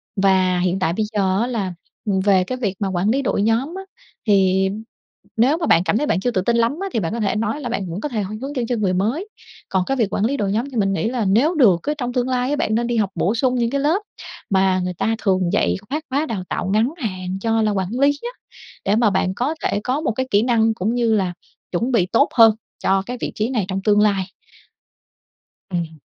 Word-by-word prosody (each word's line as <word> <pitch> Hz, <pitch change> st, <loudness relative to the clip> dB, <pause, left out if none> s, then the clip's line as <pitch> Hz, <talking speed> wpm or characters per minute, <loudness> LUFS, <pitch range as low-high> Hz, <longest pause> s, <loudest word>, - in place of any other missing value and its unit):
và 190 Hz, -2 st, +3 dB
hiện 180 Hz, +1 st, 0 dB
tại 170 Hz, -3 st, +1 dB
bây 215 Hz, +4 st, -1 dB
giờ 195 Hz, -1 st, +1 dB
á 235 Hz, -, 0 dB
là, 205 Hz, -7 st, -2 dB, 0.3 s
ừm, 200 Hz, -3 st, +1 dB
về 190 Hz, -1 st, +3 dB
cái 255 Hz, +7 st, -4 dB
việc 205 Hz, -7 st, -2 dB
mà 200 Hz, -, -1 dB
quản 190 Hz, +2 st, 0 dB
lý 265 Hz, +5 st, +2 dB
đội 230 Hz, -5 st, 0 dB
nhóm 230 Hz, -, 0 dB
á, 385 Hz, -, -6 dB, 0.4 s
thì 190 Hz, -2 st, +3 dB, 0.7 s
nếu 260 Hz, +8 st, +3 dB
mà 335 Hz, -, -2 dB
bạn 165 Hz, -, +4 dB
cảm 200 Hz, -, +1 dB
thấy 295 Hz, -, 0 dB
bạn 180 Hz, -, +1 dB
chưa 245 Hz, +6 st, 0 dB
tự 190 Hz, -, 0 dB
tin 235 Hz, +5 st, +1 dB
lắm 235 Hz, +4 st, +2 dB
á 390 Hz, -, -2 dB
thì -, -, +1 dB
bạn 175 Hz, 0 st, -2 dB
có 235 Hz, -, -3 dB
thể 210 Hz, -2 st, 0 dB
nói 230 Hz, +7 st, -1 dB
là 245 Hz, -, -4 dB
bạn 200 Hz, -6 st, -3 dB
vẫn 170 Hz, -, -4 dB
có 300 Hz, -, -3 dB
thể 225 Hz, -5 st, -2 dB
h 195 Hz, -, -3 dB
hướng 280 Hz, +2 st, -5 dB
dẫn 245 Hz, -3 st, -1 dB
cho 245 Hz, -, 0 dB
người 200 Hz, -5 st, 0 dB
mới. 230 Hz, -, -1 dB, 0.4 s
Còn 190 Hz, -1 st, +1 dB
cái 270 Hz, -, -1 dB
việc 220 Hz, -5 st, 0 dB
quản 200 Hz, -, +1 dB
lý 275 Hz, +5 st, 0 dB
đội 200 Hz, -5 st, -1 dB
nhóm 230 Hz, +7 st, -1 dB
thì 250 Hz, -, -5 dB
mình 195 Hz, -2 st, +2 dB
nghĩ 205 Hz, -, -1 dB
là 240 Hz, -3 st, -1 dB
nếu 240 Hz, -, +3 dB
được 215 Hz, -, +5 dB
á, 295 Hz, -, 0 dB
trong 245 Hz, -3 st, -3 dB
tương 250 Hz, -1 st, 0 dB
lai 250 Hz, 0 st, 0 dB
á, 290 Hz, -, +1 dB
bạn 220 Hz, -7 st, 0 dB
nên 235 Hz, +1 st, 0 dB
đi 240 Hz, -1 st, -1 dB
học 205 Hz, -3 st, +1 dB
bổ 185 Hz, +6 st, +1 dB
sung 250 Hz, +2 st, +1 dB
những 235 Hz, -2 st, +1 dB
cái 280 Hz, +2 st, -1 dB
lớp 320 Hz, +8 st, +2 dB, 0.5 s
mà 190 Hz, -1 st, +3 dB
người 180 Hz, 0 st, -2 dB
ta 225 Hz, +6 st, 0 dB
thường 190 Hz, -4 st, +1 dB
dạy -, -, +2 dB
khác 305 Hz, +3 st, -2 dB
khóa 280 Hz, +4 st, 0 dB
đào 210 Hz, -10 st, -4 dB
tạo -, -, -2 dB
ngắn 225 Hz, +7 st, +2 dB
hạn 185 Hz, -, -4 dB
cho 225 Hz, 0 st, +1 dB
là 215 Hz, -1 st, +2 dB
quản 190 Hz, -2 st, -1 dB
lý 280 Hz, +1 st, +5 dB
á, 480 Hz, -, -4 dB, 0.6 s
để 200 Hz, -, +2 dB
mà 225 Hz, -1 st, +4 dB
bạn 190 Hz, -1 st, 0 dB
có 275 Hz, +8 st, -1 dB
thể -, -, 0 dB
có 260 Hz, +4 st, -1 dB
một 310 Hz, -, 0 dB
cái 260 Hz, +4 st, -3 dB
kỹ 205 Hz, +1 st, +4 dB
năng 225 Hz, -2 st, +2 dB
cũng 220 Hz, +3 st, -1 dB
như 235 Hz, -2 st, +2 dB
là 185 Hz, -4 st, 0 dB, 0.4 s
chuẩn 230 Hz, +8 st, -1 dB
bị 220 Hz, -8 st, +3 dB
tốt 230 Hz, +9 st, +2 dB
hơn 225 Hz, -2 st, +7 dB, 0.3 s
cho 195 Hz, 0 st, +3 dB
cái 250 Hz, +3 st, -5 dB
vị -, -, -2 dB
trí 215 Hz, +2 st, -1 dB
này 230 Hz, -7 st, 0 dB
trong 190 Hz, 0 st, -2 dB
tương 210 Hz, 0 st, +4 dB
lai. 200 Hz, -2 st, +2 dB, 1.5 s
Ừm. 165 Hz, -4 st, -4 dB
220 Hz, 260 wpm, -21 LUFS, 190-250 Hz, 1.5 s, hơn